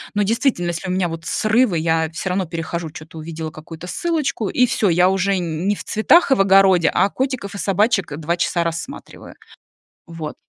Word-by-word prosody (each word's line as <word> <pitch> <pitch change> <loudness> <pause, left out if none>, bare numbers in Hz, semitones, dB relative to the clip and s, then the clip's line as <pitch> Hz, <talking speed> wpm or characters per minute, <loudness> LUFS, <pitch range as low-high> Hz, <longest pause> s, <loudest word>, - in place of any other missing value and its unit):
Но 205 - +2
действительно, 230 -3 0
если 170 +2 -5
у - - -1
меня 185 -1 0
вот 165 0 -7
срывы, 215 -2 +2
я, 160 0 +1
э, - - -14
всё 165 +4 -5
равно 185 +1 0
перехожу, 165 0 -5
чё-то 160 -1 -11
увидела 160 0 -6
какую-то 160 +2 -10
ссылочку, 285 - -2
и 250 - +3
всё, 220 -4 +1
я 180 +1 +4
уже 195 +1 +1
нь 170 +1 -3
не 205 - +2
в - - -9
цветах 280 +9 +3
и - - +6
в - - +2
огороде, 195 -3 +5
а 200 - +3
котиков 255 -5 -3
и - - -5
собачек 195 -5 0
2 165 +2 -1
часа 170 0 0
рассматриваю. 170 +12 -7 0.7
Вот. 165 -3 -7
180 Hz, 200 wpm, -20 LUFS, 165-210 Hz, 0.7 s, и